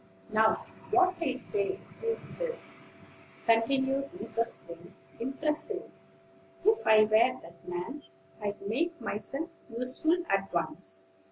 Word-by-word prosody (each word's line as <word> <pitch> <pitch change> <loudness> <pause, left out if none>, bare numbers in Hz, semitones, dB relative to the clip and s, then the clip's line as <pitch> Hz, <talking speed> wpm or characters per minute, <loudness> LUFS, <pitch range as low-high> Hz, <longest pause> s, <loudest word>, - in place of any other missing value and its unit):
"Now, 220 0 +4 0.2
what 370 0 +5
I 305 -5 +2
say 390 +9 -1 0.2
is 455 0 -1
this," - - -3 0.7
continued 265 +4 +3
Mrs. 230 - -2
Wing 170 +2 -11 0.2
impressively. 305 - -2 0.7
"If 435 +1 +4
I 215 0 +9
were 220 +4 +4
that 170 0 -15
man, 180 +12 -4 0.4
I'd 205 0 -2
make 320 +12 0
myself 275 +10 -3 0.2
useful 250 +8 +1
at 195 0 +1
once. 95 - -3
250 Hz, 110 wpm, -31 LUFS, 215-330 Hz, 0.7 s, I